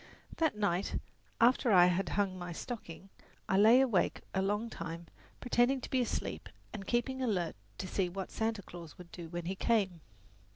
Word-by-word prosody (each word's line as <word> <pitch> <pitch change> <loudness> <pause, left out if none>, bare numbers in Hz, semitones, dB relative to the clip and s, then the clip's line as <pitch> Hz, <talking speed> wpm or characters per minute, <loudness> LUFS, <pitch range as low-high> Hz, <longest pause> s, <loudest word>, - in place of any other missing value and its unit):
That 320 -9 +1
night, 200 -2 0 0.4
after 245 0 +4
I 180 -3 +8
had 180 +1 +1
hung 200 -2 +1
my 175 -1 -6
stocking, 195 -3 -7 0.4
I - - +1
lay 220 +6 +7
awake 235 -9 +1
a 190 - +1
long 205 +4 0
time, 165 -4 -6 0.3
pretending 245 +2 +2
to - - -8
be 260 - +3
asleep 240 - -3 0.2
and 195 -3 -7
keeping 260 +2 0
alert 185 -9 0 0.2
to 185 - -4
see 185 -1 0
what 190 +1 -5
Santa 220 -2 -1
Claus 170 -3 -10
would 175 -1 -12
do 170 -2 -8
when 175 0 -5
he 185 - -1
came. 195 -5 +1
195 Hz, 175 wpm, -33 LUFS, 175-235 Hz, 0.4 s, I